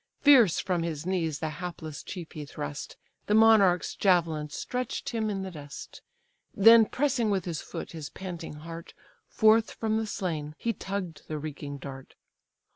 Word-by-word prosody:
Fierce 245 - +6
from 180 -3 0
his 165 -2 -4
knees 170 -5 -1
the 160 - -3
hapless 160 -4 -6
chief 175 -4 -8
he 150 - -6
thrust; 75 - -6 0.3
The 210 - +3
monarch's 215 -5 +5
javelin 165 -6 +2
stretch'd 250 - -4
him 225 -4 -1
in 195 -2 -2
the 190 - -6
dust, 145 -4 -10 0.5
Then 225 +2 +8
pressing 255 -4 0
with 195 -4 0
his 165 -4 -3
foot - - -7
his 155 -3 -7
panting 175 -5 -7
heart, 165 0 -9 0.3
Forth 220 0 +4
from 220 -1 -1
the 220 0 -1
slain 155 -7 -3
he 230 - -1
tugg'd 190 -6 -5
the 155 - -3
reeking 145 -1 -6
dart. 135 -1 -10
180 Hz, 160 wpm, -28 LUFS, 155-215 Hz, 0.5 s, Then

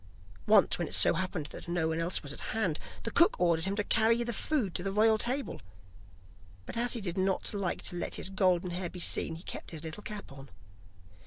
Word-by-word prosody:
Once 210 -4 +5
when 170 - -1
it - - -2
so - - +5
happened 180 -2 -2
that - - -9
no 170 -2 0
one 160 0 -1
else 165 +1 -1
was 145 0 -3
at - - -8 0.2
hand, 185 -9 0 0.2
the - - -3
cook 340 - +4
ordered 170 -2 +2
him 195 +1 -1
to 210 - 0
carry 230 +2 +3
the 235 0 -3
food 230 - -1
to - - -2
the 195 +2 -2
royal 215 +2 +4
table, 260 - -1 1.0
but - - -7
as 240 +1 +2
he 235 - -2
did 180 -2 -3
not 190 +2 0
like 200 -3 -2
to - - -2
let 175 - -2
his 190 - -3
golden 185 -2 +2
hair 175 0 -3
be 180 - -9
seen, 165 -1 +2
he 165 - -10
kept - - -7
his 160 -2 -8
little 160 +6 -7
cap 210 -7 -7
on. 135 0 -11
185 Hz, 230 wpm, -31 LUFS, 170-215 Hz, 1.0 s, Once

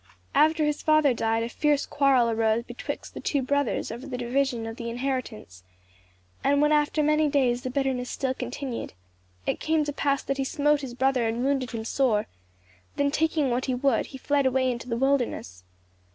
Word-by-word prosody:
After 310 +2 +4
his 300 0 -1
father 310 -3 +4
died 225 -1 0
a 230 - -3
fierce 295 +2 +1
quarrel 275 -4 +3
arose 225 0 +1
betwixt 240 0 -7
the - - -7
two 280 -3 -1
brothers 285 +2 0
over 255 +4 -7
the 255 -3 -4
division 245 -1 -1
of 225 +1 -6
the 235 -2 -4
inheritance; 240 - -4 0.8
and 280 +1 +3
when 300 +1 +3
after 300 0 +2
many 305 0 +3
days 250 -4 +2
the 255 - -4
bitterness 260 -2 -1
still 265 -1 -1
continued, 250 0 -5 0.5
it - - -1
came 315 -1 +1
to 290 0 -3
pass 280 -1 0
that 275 - -2
he 270 - 0
smote 295 +1 +1
his 255 -3 -7
brother 260 -2 +2
and 230 +2 -2
wounded 270 -2 0
him 225 -1 -5
sore; 230 -4 +1 0.7
then 285 0 +1
taking 310 -3 +1
what 245 +2 0
he 255 - 0
would 260 -2 +1
he 265 - -9
fled 280 +1 +1
away 260 0 +2
into 240 +1 -6
the 230 - -1
wilderness. 245 - -1
265 Hz, 190 wpm, -26 LUFS, 240-285 Hz, 0.8 s, After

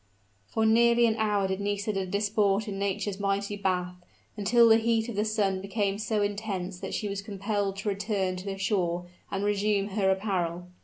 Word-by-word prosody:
For 220 - 0
nearly 235 +1 +5
an 225 -1 +2
hour 210 -3 +1
did 190 0 -2
Nisida 205 -1 -1
disport 205 +1 +1
in 195 -1 -4
Nature's 200 0 -2
mighty 200 +1 -1
bath 180 -2 -1 0.4
until 230 +3 +4
the 225 0 +7
heat 225 0 +1
of 235 - -5
the 205 - +1
sun 205 -3 0
became 200 0 -1
so 215 -1 0
intense 200 -3 -3
that - - -4
she 210 - -2
was 200 0 -3
compelled 200 0 -2
to 195 +2 -2
return 195 -2 -1
to 185 - -8
the 195 -1 -4
shore 180 -3 0 0.3
and 195 0 -2
resume 205 0 +1
her 195 -1 +1
apparel. 180 -3 -1
200 Hz, 185 wpm, -28 LUFS, 195-215 Hz, 0.4 s, the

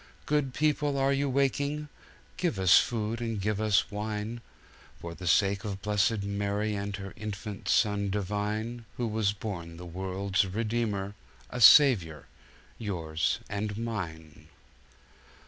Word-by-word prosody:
Good 145 -4 0
people, 150 -2 +1
are 135 0 +2
you 140 0 0
waking? 140 +3 0 0.5
Give 170 - -1
us 95 -1 +7
food 115 0 -2
and 115 -3 -2
give 105 +1 -1
us 105 -2 +2
wine, 105 +2 -4 0.6
For 85 0 -7
the 90 +1 -7
sake 100 +4 +3
of 100 -2 -5
blessed 105 0 +1
Mary 100 +1 -1
And 100 0 -3
her 95 -2 -7
Infant 100 -1 -6
Son 105 -1 +2
Divine, 105 +4 -2
Who 120 - -1
was 110 -2 +1
born 85 -6 -6
the 90 - -9
world's 95 +3 -1
Redeemer— 105 0 -2 0.4
A 125 - -4
Saviour—yours 80 - +3
and 105 0 -3
mine! 80 -9 -6
105 Hz, 130 wpm, -29 LUFS, 95-115 Hz, 0.6 s, us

